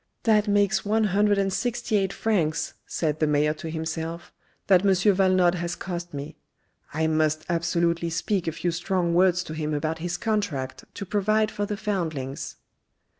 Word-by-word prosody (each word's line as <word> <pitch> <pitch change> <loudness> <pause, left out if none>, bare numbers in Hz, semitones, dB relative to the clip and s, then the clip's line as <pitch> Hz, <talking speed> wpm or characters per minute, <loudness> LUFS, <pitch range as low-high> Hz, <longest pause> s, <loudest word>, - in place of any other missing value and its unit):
" - - -49
That 215 -2 +3
makes 205 -1 +2
one 220 +2 +1
hundred 205 0 +3
and 195 -1 +1
sixty 240 +2 -1
eight 195 -2 +2
francs," 180 -9 0
said 155 -2 -1
the 155 - +2
mayor 150 +1 +2
to 160 +1 -7
himself, 160 +1 -4 0.3
"that 185 -2 +5
M. - - +2
Valenod 185 -2 +4
has 175 -1 -3
cost 175 -1 -5
me. 145 +2 -7 0.5
I 160 +2 0
must 155 -1 +1
absolutely 170 0 0
speak 175 +3 -1
a - - +1
few 175 +2 -2
strong 175 0 0
words 180 0 +4
to 155 - -7
him 155 -1 -2
about 155 +2 -2
his 175 +1 -3
contract 200 - -2
to 200 - -5
provide 215 +2 +1
for 205 0 -3
the 210 - -3
foundlings." 160 -10 -3
175 Hz, 175 wpm, -25 LUFS, 160-200 Hz, 0.5 s, that